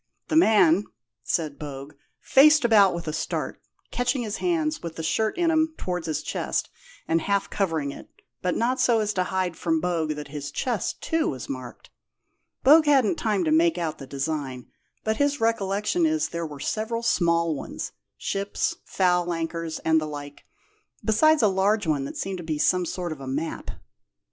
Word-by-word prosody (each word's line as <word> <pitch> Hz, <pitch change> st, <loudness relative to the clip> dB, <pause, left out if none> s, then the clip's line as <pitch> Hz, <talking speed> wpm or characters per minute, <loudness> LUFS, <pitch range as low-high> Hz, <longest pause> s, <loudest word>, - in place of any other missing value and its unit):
"The -, -, 0 dB
man 210 Hz, -, +5 dB, 0.4 s
(said 155 Hz, -4 st, -2 dB
Bogue) 140 Hz, -1 st, -7 dB, 0.3 s
faced 300 Hz, 0 st, +5 dB
about 205 Hz, -6 st, +5 dB
with 170 Hz, -1 st, -6 dB
a 155 Hz, -, -2 dB
start, -, -, -3 dB, 0.3 s
catching 245 Hz, +1 st, 0 dB
his 215 Hz, -1 st, -3 dB
hands 320 Hz, -3 st, 0 dB
with 170 Hz, -2 st, -6 dB
the 160 Hz, -, -5 dB
shirt 220 Hz, -, 0 dB
in 340 Hz, -2 st, +2 dB
'em 315 Hz, 0 st, +1 dB
towards 180 Hz, -2 st, -3 dB
his 155 Hz, -2 st, -2 dB
chest, -, -, -2 dB, 0.4 s
and 165 Hz, 0 st, +2 dB
half 200 Hz, +3 st, 0 dB
covering 160 Hz, -8 st, -1 dB
it, -, -, -11 dB, 0.3 s
but 180 Hz, -1 st, 0 dB
not 250 Hz, +3 st, 0 dB
so 235 Hz, -2 st, +3 dB
as 210 Hz, -1 st, 0 dB
to 185 Hz, -2 st, 0 dB
hide 185 Hz, -2 st, -1 dB
from 160 Hz, 0 st, 0 dB
Bogue 165 Hz, -3 st, -1 dB
that 150 Hz, -1 st, -8 dB
his 145 Hz, -1 st, -5 dB
chest, 225 Hz, -, -2 dB
too, 325 Hz, -1 st, +1 dB
was 130 Hz, -3 st, -6 dB
marked. 130 Hz, -3 st, -8 dB, 0.7 s
Bogue 305 Hz, +3 st, +7 dB
hadn't 270 Hz, -8 st, +4 dB
time 210 Hz, -4 st, 0 dB
to 155 Hz, -, 0 dB
make 165 Hz, +2 st, +4 dB
out 165 Hz, -3 st, -3 dB
the 135 Hz, -, -9 dB
design, 140 Hz, -2 st, -3 dB, 0.4 s
but 220 Hz, 0 st, 0 dB
his 285 Hz, 0 st, +1 dB
recollection 225 Hz, -, +1 dB
is 315 Hz, 0 st, 0 dB
there 170 Hz, -1 st, -3 dB
were 145 Hz, -2 st, -9 dB
several 225 Hz, +7 st, -2 dB
small 170 Hz, -6 st, +2 dB
ones 140 Hz, -, -6 dB, 0.3 s
ships, 200 Hz, +1 st, -2 dB
foul 180 Hz, -2 st, +1 dB
anchors, 165 Hz, -1 st, -3 dB
and 160 Hz, 0 st, +4 dB
the 155 Hz, -, -3 dB
like 145 Hz, -1 st, -8 dB, 0.6 s
besides 305 Hz, +6 st, +4 dB
a -, -, +6 dB
large 200 Hz, +2 st, +2 dB
one 145 Hz, -4 st, 0 dB
that -, -, -7 dB
seemed 190 Hz, -1 st, -3 dB
to -, -, -6 dB
be 160 Hz, -2 st, -2 dB
some 180 Hz, +3 st, +2 dB
sort 175 Hz, -1 st, -4 dB
of 150 Hz, -3 st, -7 dB
a 135 Hz, -, -7 dB
map." 150 Hz, +5 st, -4 dB
180 Hz, 185 wpm, -25 LUFS, 155-225 Hz, 0.7 s, Bogue